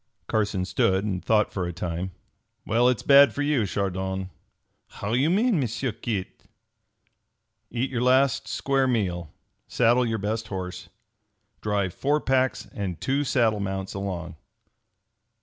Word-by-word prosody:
Carson 105 Hz, -4 st, 0 dB
stood 95 Hz, +1 st, +1 dB
and 95 Hz, -3 st, -2 dB
thought 110 Hz, -1 st, +2 dB
for 90 Hz, -3 st, -2 dB
a -, -, -3 dB
time. 85 Hz, +1 st, -4 dB, 0.6 s
"Well, 120 Hz, +3 st, +3 dB
its 125 Hz, -, -1 dB
bad 140 Hz, 0 st, +7 dB
for 145 Hz, -, -1 dB
you, 145 Hz, -8 st, +1 dB
Chardon!" 95 Hz, -1 st, -2 dB, 0.6 s
"How 100 Hz, +2 st, -5 dB
you 135 Hz, +6 st, +3 dB
mean, 210 Hz, +1 st, +2 dB
M'sieu 125 Hz, 0 st, -1 dB
Kit?" 110 Hz, -3 st, -5 dB, 1.2 s
"Eat 125 Hz, +3 st, -2 dB
your 120 Hz, -2 st, -1 dB
last 130 Hz, +1 st, +3 dB
square 135 Hz, -1 st, +1 dB
meal. 90 Hz, -9 st, -1 dB, 0.4 s
Saddle 120 Hz, +1 st, +3 dB
your 110 Hz, -1 st, -1 dB
best 110 Hz, +2 st, -3 dB
horse. 90 Hz, -2 st, -6 dB, 0.7 s
Drive 100 Hz, -3 st, -1 dB
four 145 Hz, +7 st, +1 dB
packs 130 Hz, -2 st, +1 dB
and 95 Hz, -4 st, -4 dB
two 140 Hz, +2 st, 0 dB
saddle 115 Hz, -6 st, +2 dB
mounts 95 Hz, -1 st, -3 dB
along." 90 Hz, -4 st, -5 dB
105 Hz, 135 wpm, -25 LUFS, 95-130 Hz, 1.2 s, bad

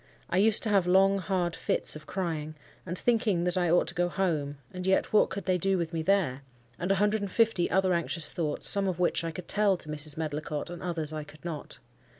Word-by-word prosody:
I 180 Hz, -, +1 dB
used 215 Hz, +1 st, +4 dB
to 220 Hz, -, +3 dB
have 195 Hz, -3 st, +3 dB
long, 195 Hz, +2 st, +4 dB
hard 180 Hz, -2 st, -1 dB
fits -, -, 0 dB
of 155 Hz, 0 st, -11 dB
crying; 160 Hz, -5 st, -4 dB, 0.3 s
and, 180 Hz, +1 st, -4 dB
thinking 220 Hz, -7 st, +1 dB
that 180 Hz, 0 st, 0 dB
I 175 Hz, -2 st, +1 dB
ought 175 Hz, +2 st, +3 dB
to -, -, -3 dB
go 175 Hz, 0 st, 0 dB
home—and 155 Hz, -2 st, -3 dB
yet 190 Hz, +2 st, +1 dB
what 215 Hz, -, +4 dB
could 195 Hz, +1 st, -6 dB
they 185 Hz, -1 st, +1 dB
do 195 Hz, +2 st, +1 dB
with 170 Hz, -1 st, -3 dB
me 165 Hz, -, -1 dB
there?—and 135 Hz, -4 st, -2 dB
a -, -, +4 dB
hundred 210 Hz, +2 st, +1 dB
and 200 Hz, -, -3 dB
fifty 220 Hz, -4 st, +2 dB
other 185 Hz, 0 st, +2 dB
anxious 165 Hz, -2 st, 0 dB
thoughts, 155 Hz, -4 st, -1 dB
some 200 Hz, -1 st, +4 dB
of 185 Hz, -3 st, -2 dB
which 180 Hz, -1 st, +1 dB
I 165 Hz, -, -2 dB
could 175 Hz, +2 st, -8 dB
tell 205 Hz, -2 st, +2 dB
to 155 Hz, -, -8 dB
Mrs. 150 Hz, 0 st, +1 dB
Medlicott, 155 Hz, 0 st, -4 dB
and 175 Hz, -, -8 dB
others 165 Hz, -4 st, -3 dB
I 155 Hz, -1 st, -4 dB
could 150 Hz, +2 st, -16 dB
not. 160 Hz, -4 st, -6 dB
175 Hz, 225 wpm, -28 LUFS, 155-190 Hz, 0.3 s, used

